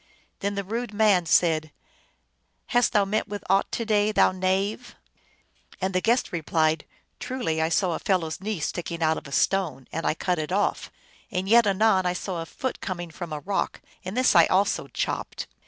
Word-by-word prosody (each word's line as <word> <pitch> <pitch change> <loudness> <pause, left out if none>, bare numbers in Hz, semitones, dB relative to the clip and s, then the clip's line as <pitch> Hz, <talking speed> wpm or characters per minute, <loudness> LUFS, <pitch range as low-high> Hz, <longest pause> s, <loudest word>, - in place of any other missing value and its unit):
Then 200 +1 -2
the 200 - -2
rude 225 +2 -4
man 205 -5 +3
said, 160 -2 +3 0.5
" - - -47
Hast 245 -1 +4
thou 205 -2 +3
met 210 +2 -1
with 205 -1 -6
aught 195 0 +2
to 230 - -2
day, 210 -1 +2
thou 210 - +4
knave? 190 +6 -1 0.4
" - - -27
And 190 0 -1
the 185 - +1
guest 235 +3 +1
replied, 160 -2 0 0.2
" - - -46
Truly 240 -12 -2
I 160 - +1
saw 175 +1 +1
a - - -3
fellow 185 -4 +1
s 160 +3 -6
knee 210 -2 -3
sticking 170 +1 -3
out 160 0 +2
of - - -14
a - - -11
stone, 155 -5 0
and 165 0 -2
I - - +1
cut 180 0 -1
it 155 +2 -4
off. 200 +2 0 0.4
And 185 0 -2
yet, 230 +1 +6
anon, 195 -2 +3
I 180 - +1
saw 180 -1 -4
a 165 - -7
foot 260 +7 -4
coming 175 -4 -5
from 170 +1 -7
a 150 -1 -4
rock, 195 +3 -2 0.2
and 185 +6 -5
this 255 -5 +4
I 170 -1 +7
also 195 +2 +1
chopped. - - -3
185 Hz, 205 wpm, -25 LUFS, 165-205 Hz, 0.5 s, I